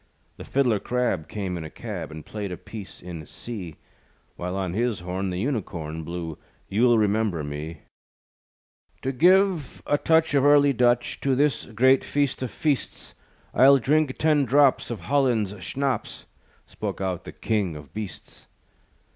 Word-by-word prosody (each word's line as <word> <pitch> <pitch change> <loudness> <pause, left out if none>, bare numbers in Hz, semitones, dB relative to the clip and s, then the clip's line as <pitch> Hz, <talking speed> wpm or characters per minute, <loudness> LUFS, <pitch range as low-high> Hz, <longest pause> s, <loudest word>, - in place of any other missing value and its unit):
The - - -8
fiddler 125 -6 +1
crab 120 -11 -1
Came 95 -4 -4
in - - -6
a 80 - -7
cab, - - -6
And 80 -1 -9
played 105 -3 -5
a 90 - -5
piece 105 -4 -10
in 85 -3 -7
C; 95 -10 -7 0.6
While 90 +1 -4
on 95 -3 -2
his 115 -2 0
horn, 95 +2 -3
The 90 - -3
Unicorn 85 - -3
Blew, 85 -1 -5 0.3
You'll 120 +3 +4
Remember 105 -5 +1
Me. 75 +2 -6 1.2
"To 135 - 0
give 180 +1 +3
a 145 - +1
touch 160 -2 +3
Of 140 -2 +4
early 145 -1 +6
Dutch 120 0 +2
To 135 -1 +2
this 140 -2 +1
great 130 +4 +4
feast 145 -3 0
of 130 - -2
feasts, 145 0 -2 0.4
I'll 135 +2 +7
drink 145 +2 +1
ten 155 -2 +3
drops 140 +1 +3
Of 120 - -5
Holland's 125 -8 +1
schnapps," 135 -4 -2 0.4
Spoke - - -5
out 95 -3 -2
the - - -8
King 100 -7 -1
of 75 -2 -11
Beasts. 105 -3 -8
115 Hz, 155 wpm, -25 LUFS, 90-135 Hz, 1.2 s, I'll